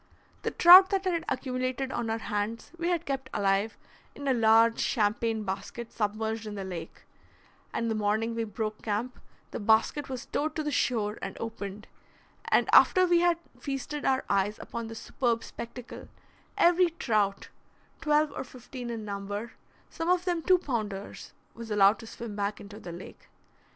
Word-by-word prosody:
The - - -1
trout 370 +2 +9
that 390 -1 0
had 340 -3 0
accumulated 255 0 -2
on 230 -3 -2
our 225 - 0
hands 215 +1 -3
we 340 - -1
had 345 -2 0
kept 270 -1 -3
alive 200 +2 +1 0.4
in 285 - -6
a 265 - +4
large 225 0 +4
champagne 220 0 0
basket 200 +4 -5
submerged 220 +1 -2
in 210 - -6
the 195 - -4
lake, 175 -3 -7 0.7
and 230 - -2
the 225 - 0
morning 215 +2 0
we 230 0 -1
broke 215 0 -4
camp 225 +4 -3 0.3
the - - -4
basket 225 +7 +2
was 255 -2 -5
towed 310 +1 -2
to 310 - -1
the 295 - -2
shore 220 -5 0
and 195 - -5
opened; 210 -2 -6 0.6
and - - +3
after 370 -1 +7
we 350 -1 +4
had 345 -1 +3 0.2
feasted 280 +1 -4
our 265 -1 +1
eyes 200 +1 +1
upon 235 -1 -6
the 225 - -8
superb 230 0 -1
spectacle, 235 +1 -9 0.5
every 350 +1 +5
trout, 215 - -1 0.5
twelve 300 -1 +2
or - - -3
fifteen 250 -1 -9
in 225 -2 -5
number, 205 +2 -5 0.4
some 330 +1 -3
of 360 0 +2
them 350 -2 0
two 370 +3 +5
pounders, 215 - -5 0.2
was 230 -1 -9
allowed 205 0 +4
to 225 - -10
swim 225 -2 -7
back 205 +1 -2
into 205 +1 -10
the 175 - -8
lake. 175 +2 -11
230 Hz, 170 wpm, -28 LUFS, 210-275 Hz, 0.7 s, trout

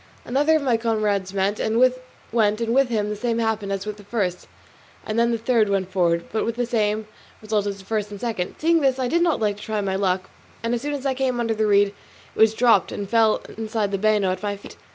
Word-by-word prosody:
Another 290 +5 +2
of 310 - +1
my 245 -4 +2
comrades 215 -4 0
went, 200 +1 0
and 220 +1 0
with 255 0 +4 0.3
him 230 0 +2
the 210 - -2
same 230 +2 -1
happened 220 -3 -1
as 195 0 -3
with 210 -1 -5
the 205 - -13
first, 195 -4 -2 0.6
and 215 +1 -1
then 235 0 +3
the 230 - 0
third 225 -2 +2
went 190 -2 -1
forward, 170 -2 +1
but 220 - 0
with 230 - -2
the 245 0 -1
same 215 -2 0 0.3
result 215 -1 -1
as 200 -1 -3
the 190 - -14
first 210 0 -2
and 205 -1 -8
second. 215 -6 -3
Seeing 330 +1 +3
this 265 -2 +2
I 260 -1 -1
did 340 +7 +1
not 340 -3 +2
like 210 -2 0
not - - -12
to - - -10
try 215 -1 -2
my 195 -1 -1
luck, 185 -1 -1 0.3
and 230 +1 0
as 240 - -1
soon 290 +1 -2
as 280 -1 -6
I 270 - +2
came 255 -2 -1
under 230 -1 0
the 215 0 0
reed 200 0 +4
it - - -16 0.4
was 220 0 +4
dropped 230 -5 +4
and 200 - -4
fell 220 0 +3 0.2
inside 220 -2 -1
the 195 - -1
bano 210 -2 +2
at 185 - -4
my 205 -1 -2
feet. 200 - -12
215 Hz, 250 wpm, -23 LUFS, 200-235 Hz, 0.6 s, with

